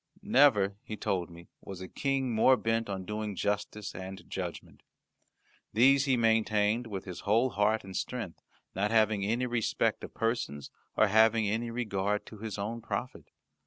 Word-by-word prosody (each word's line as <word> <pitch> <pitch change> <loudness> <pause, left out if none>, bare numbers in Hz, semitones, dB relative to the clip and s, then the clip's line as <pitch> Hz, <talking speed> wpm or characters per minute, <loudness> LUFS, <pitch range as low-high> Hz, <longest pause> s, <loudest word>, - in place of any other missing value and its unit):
Never, 120 - +4
he 110 - -7
told 90 -3 -1
me, 85 0 -13 0.2
was 95 -2 -8
a 95 - -7
King 135 0 -1
more 130 +4 +5
bent 115 -1 -1
on 95 -2 -4
doing 105 0 -4
justice 105 +1 -2
and 95 +1 -8
judgment. - - -6 0.9
These 135 +5 +5
he 130 -3 +2
maintained 110 0 +2
with 100 -4 -6
his 90 -3 -7
whole 115 +5 +2
heart 105 +2 +1
and 95 -1 -9
strength, 115 -9 -4 0.3
not 100 +3 0
having 110 -2 +3
any 115 +5 0
respect 120 -3 0
of - - -9
persons, 115 - -2 0.3
or - - +6
having 110 +1 +3
regard 105 -3 -1
to 110 - -12
his 110 -1 -5
own 110 +4 -4
profit. 120 +2 -5
110 Hz, 160 wpm, -30 LUFS, 100-115 Hz, 0.9 s, or